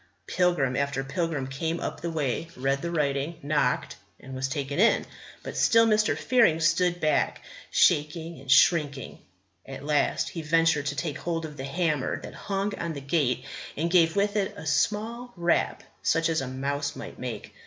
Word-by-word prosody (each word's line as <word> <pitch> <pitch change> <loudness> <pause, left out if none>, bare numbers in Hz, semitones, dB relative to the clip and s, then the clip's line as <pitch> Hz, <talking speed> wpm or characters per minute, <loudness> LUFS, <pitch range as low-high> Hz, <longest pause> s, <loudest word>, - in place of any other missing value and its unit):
Pilgrim 175 - +1
after 140 -1 -1
pilgrim 160 -1 -2
came 160 +5 -3
up - - -5
the 170 - -2
way, 155 -1 -2
read 135 +2 0
the 170 - -3
writing, 150 0 -1
knocked, 145 +1 0 0.2
and 130 - -10
was 130 0 -2
taken 140 +2 -3
in; 230 +3 +4 0.4
but - - -6
still 230 0 +5
Mr. 215 -1 +2
Fearing 230 -11 +3
stood 175 +2 +2
back, 155 -2 +1 0.3
shaking 160 0 +2
and 135 0 -13
shrinking. 145 -4 +3 0.4
At 135 +1 -9
last 150 -1 +1
he 165 - -6
ventured 160 -2 +2
to 145 - -2
take 145 0 -3
hold 165 -1 -2
of 150 -1 -8
the 135 -1 -6
hammer 150 -2 -1
that - - -9
hung 200 0 -2
on 170 -1 -3
the 145 - -6
gate 135 -3 0 0.3
and 165 +3 -1
gave 165 -2 +4
with 200 +1 +1
it 195 -2 -1
a - - -8
small 225 +9 -1
rap 170 0 +1 0.2
such 165 0 +2
as 160 -2 +1
a 135 - -4
mouse 140 +3 -3
might - - -9
make. 120 -5 -6
155 Hz, 175 wpm, -27 LUFS, 140-170 Hz, 0.4 s, still